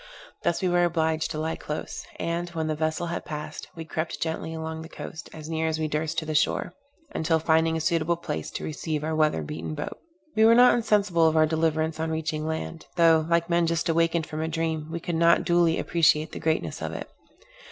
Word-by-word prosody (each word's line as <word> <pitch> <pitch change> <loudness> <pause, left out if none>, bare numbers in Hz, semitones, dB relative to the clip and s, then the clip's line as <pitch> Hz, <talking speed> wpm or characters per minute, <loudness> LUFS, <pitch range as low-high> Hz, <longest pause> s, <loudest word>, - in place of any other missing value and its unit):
Thus 170 - 0
we - - +3
were 175 0 +3
obliged 160 -2 +1
to 155 - -4
lie 160 +1 -1
close; 150 - -6
and, 170 +1 -2
when 165 -2 -3
the 155 - 0
vessel 155 +2 -1
had 170 0 -3
passed, 150 -1 -6
we 165 -1 -6
crept 160 0 -3
gently 160 0 -3
along 160 0 -5
the 160 - -9
coast, 155 - -8
as 155 -1 -9
near 160 0 -1
as 160 -1 0
we 155 -1 -1
durst 155 +1 -2
to 160 - 0
the 155 - -3
shore, 150 - +1 0.4
until 160 0 +2
finding 160 0 +2
a - - -2
suitable 165 +1 +1
place 80 - -4
to - - -4
receive 155 0 -3
our 160 +1 -1
weather 155 - +2
beaten 80 +1 -5
boat. - - -5 0.4
We 220 - +4
were 230 +1 +7
not 245 +1 +7
insensible 200 -7 +3
of 160 0 +2
our 155 - +6
deliverance 160 0 0
on 160 0 -1
reaching 155 -1 -2
land; 160 +1 -4
though, 165 -2 +5
like 170 0 +2
men 170 -1 +2
just 170 +1 0
awakened 165 0 +2
from 155 0 -5
a 160 - -1
dream, 160 -1 -2
we 170 +1 -3
could 170 - -4
not 170 +1 +4
duly 170 -1 +3
appreciate 155 -2 +2
the - - -6
greatness 160 0 -1
of - - -3
it. - - -5
160 Hz, 220 wpm, -26 LUFS, 155-170 Hz, 0.4 s, were